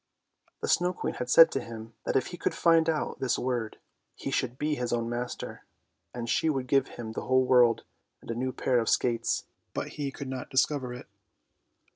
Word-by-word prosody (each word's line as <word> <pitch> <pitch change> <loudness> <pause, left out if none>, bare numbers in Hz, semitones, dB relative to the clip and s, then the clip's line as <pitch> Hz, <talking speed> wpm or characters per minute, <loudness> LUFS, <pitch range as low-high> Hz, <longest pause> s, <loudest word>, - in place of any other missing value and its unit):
The - - 0
Snow 180 +1 +2
Queen - - -3
had 125 - -5
said 165 +5 +8
to - - -1
him 115 0 -9
that - - -1
if 135 - +2
he - - -5
could - - -1
find 165 -1 +4
out 155 -2 -1
this 130 -2 +1
word 120 -3 -2 0.4
he 135 - -5
should 125 -2 -1
be 150 +2 0
his 125 -4 -2
own 115 -1 0
master, 120 +1 -5 0.5
and 120 -1 -5
she 160 - +2
would 135 -4 -1
give 135 0 +2
him 115 -2 -5
the - - -5
whole 130 0 +4
world 125 -2 +5 0.4
and - - -7
a - - -1
new 130 +2 -2
pair 125 0 +1
of 115 - 0
skates. 120 -2 +1 0.3
But - - -2
he 140 -2 -4
could 140 - -7
not 130 -1 -5
discover 130 -1 +1
it. 125 0 -8
125 Hz, 205 wpm, -28 LUFS, 120-140 Hz, 0.5 s, said